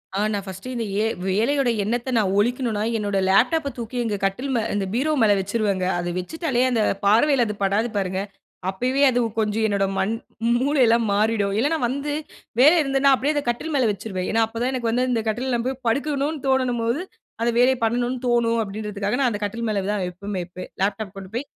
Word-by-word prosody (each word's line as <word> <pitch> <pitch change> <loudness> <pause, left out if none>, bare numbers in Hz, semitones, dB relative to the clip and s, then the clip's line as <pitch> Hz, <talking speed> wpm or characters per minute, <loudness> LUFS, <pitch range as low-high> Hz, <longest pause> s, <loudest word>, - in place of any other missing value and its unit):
ஆ - - 0
நான் 200 -1 -2
ஃபர்ஸ்ட்டு 195 +7 -7
இந்த 230 -2 -2 0.2
எ - - +1 0.2
வேலையோட 245 +7 +2
எண்ணத்த 240 +5 -2
நான் 195 -4 +2
ஒழிக்கணுன்னா, 230 -1 +1
என்னோட 205 -2 -1
லேப்டாப் 250 +12 +3
ப - - 0
தூக்கி 235 +1 -5
எங்க 215 -3 -1
கட்டில் 245 +8 -2
மே 230 - +2
இந்த 200 -1 0
பீரோ 285 +6 +1
மேலே 215 -2 +5
வச்சுருவேங்க. 200 -1 -1
அதை 175 0 -2
வச்சுட்டாலே 260 - -2
அந்த 230 -3 +1 0.2
பார்வையில 240 +5 +4
அது 210 - -4
படாது 205 +4 +1
பாருங்க. 190 -1 -1 0.5
அப்பவே 250 +8 -1
அது 245 -1 +1 0.2
கொஞ்சம் 220 0 +1
என்னோட 200 -2 +1
மண் 205 +4 +1 0.5
மூளையெல்லாம் 250 -4 +3
மாறிடும் 210 -1 +1
இல்லன்னா, 295 +8 +1
வந்து 280 +3 -3 0.5
வேலை 300 +6 +7
இருந்ததுன்னா 275 0 +3
அப்பிடியே 290 +4 -1
அத 290 - 0
கட்டில் 300 +6 -2
மேல 255 -5 +3
வச்சுருவேன். 190 -2 -4
ஏன்னா 225 +1 +3
அப்ப 225 +1 -10
தான் 255 - +1
எனக்கு 240 -3 -1
வந்து 250 +2 +1
இந்த 225 -2 0
கட்டில்ல 245 +4 -1
நான் 235 +1 -1
போய் 260 0 -4
படுக்கணுனு 285 +3 -1
தோணும்போது 250 0 +1 0.4
அந்த 235 +1 +2
வேலைய 255 +2 +5
பண்ணனு 245 +2 0
தோணும் 235 -1 +2
அப்பிடின்றதுக்காக, 205 0 -3
நான் 260 - +3
அந்த 205 - -3
கட்டில் 230 +3 -3
மேல 200 -2 0
தான் 205 -3 -1
எப்பயுமே 200 +2 -5
வைப்பேன். 180 +1 -9
லேப்டாப் 200 0 -1
கொண்டு 190 -1 -8
போய் 260 - -2
230 Hz, 190 wpm, -23 LUFS, 205-260 Hz, 0.5 s, வேலை